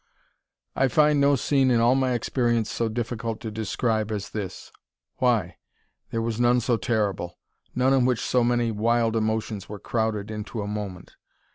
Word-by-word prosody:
I 135 - +3
find 150 +2 +3
no 140 0 +5
scene 135 0 +2
in 120 -2 +3
all 120 +2 +4
my 130 -1 +1
experience 120 -2 0
so 115 -1 -1
difficult 115 -1 -3
to 110 - -5
describe 110 +1 -1
as 105 -2 -4
this. 100 -4 -6 0.5
Why? 105 -10 +1 0.5
There 115 0 -2
was 115 0 -2
none 120 0 +4
so 120 0 +1
terrible; 105 -7 -1 0.4
none 130 +2 +3
in 135 -2 +4
which 125 -2 +1
so 125 -1 +2
many 120 -1 +1
wild 115 +1 +1
emotions 110 -2 -2
were 105 - -6
crowded 110 -1 -2
into 105 0 -5
a - - -5
moment. 105 -3 -6
115 Hz, 165 wpm, -25 LUFS, 110-125 Hz, 0.5 s, no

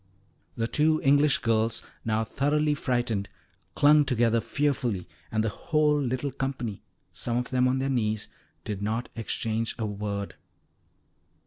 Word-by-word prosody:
The 115 - 0
two 155 +5 +2
English 145 +1 +5
girls, 115 -1 +1 0.2
now 110 0 +1
thoroughly 150 +6 +1
frightened, 120 -7 -1 0.5
clung 150 +1 +6
together 115 -3 +2
fearfully, 125 -11 -1 0.2
and 110 0 +1
the 110 - +1
whole 150 +4 +1
little 130 +1 -1
company, 130 -6 -3 0.3
some 120 0 -1
of 125 - -2
them 130 0 +3
on 130 +1 +1
their 135 +1 -1
knees, 110 -5 0 0.4
did 105 -3 -4
not 110 +4 -2
exchange 115 0 -2
a 115 - -2
word. 100 -1 -4
120 Hz, 135 wpm, -27 LUFS, 110-140 Hz, 0.5 s, clung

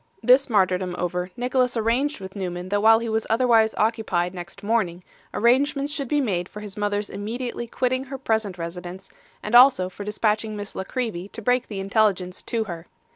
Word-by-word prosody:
This 260 +2 +5
martyrdom 185 -4 +1
over, 180 +1 -2
Nicholas 250 0 +1
arranged 240 +6 0
with 190 0 -9
Newman 180 -2 -4
that 205 +1 +1
while 225 +1 +7
he 230 +1 -3
was 220 0 -1
otherwise 225 -1 +3
occupied 210 -6 0
next 180 +3 -9
morning, 195 -5 0 0.3
arrangements 275 +5 +2
should 280 -4 -3
be 295 +4 +1
made 185 -9 -1
for 210 - -9
his 205 -2 -8
mother's 205 0 -1
immediately 235 +4 -5
quitting 255 +2 -1
her 270 0 -6
present 220 -7 -1
residence, 180 +2 -7 0.3
and 210 - -5
also 240 -7 +7
for 195 +2 -8
dispatching 215 +1 -1
Miss 205 0 -6
La 190 - -4
Creevy 215 -8 -3
to 225 - -9
break 250 +2 +1
the 200 -3 -5
intelligence 195 -2 0
to 230 -2 -2
her. 170 -4 -8
215 Hz, 180 wpm, -24 LUFS, 185-240 Hz, 0.3 s, while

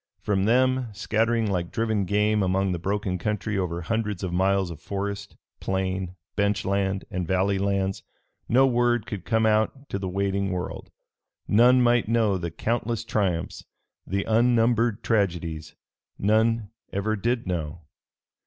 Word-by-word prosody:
From 100 -2 0
them, 130 +2 +3
scattering 115 +3 +1
like 90 -4 -2
driven 110 -3 0
game 105 +2 +2
among 95 0 +1
the 90 - -2
broken 100 0 -2
country 105 +2 -2
over 90 -3 -2
hundreds 105 0 -2
of 90 -2 -3
miles 95 0 +1
of 80 - -9
forest, 100 +1 -5 0.2
plain, 95 -1 -2 0.2
bench 100 -1 +1
land 100 0 0
and 90 -2 -3
valley 95 +2 +1
lands, 95 -1 0 0.5
no 130 +3 +5
word 120 -3 +2
could 100 -4 -6
come 110 -1 +2
out 110 +6 +1
to 100 - -3
the 95 -1 -3
waiting 100 +1 -1
world. 90 -1 -4 0.6
None 125 +4 +5
might 120 -2 +3
know 110 -4 +2
the 85 -1 -3
countless 115 +5 -2
triumphs, 95 -7 -1 0.4
the 100 +2 -1
unnumbered 115 -1 +2
tragedies 85 -7 -1 0.4
none 110 +1 +2 0.2
ever 105 +3 -1
did 120 +3 -1
know. 85 -3 -3
100 Hz, 145 wpm, -25 LUFS, 95-115 Hz, 0.6 s, no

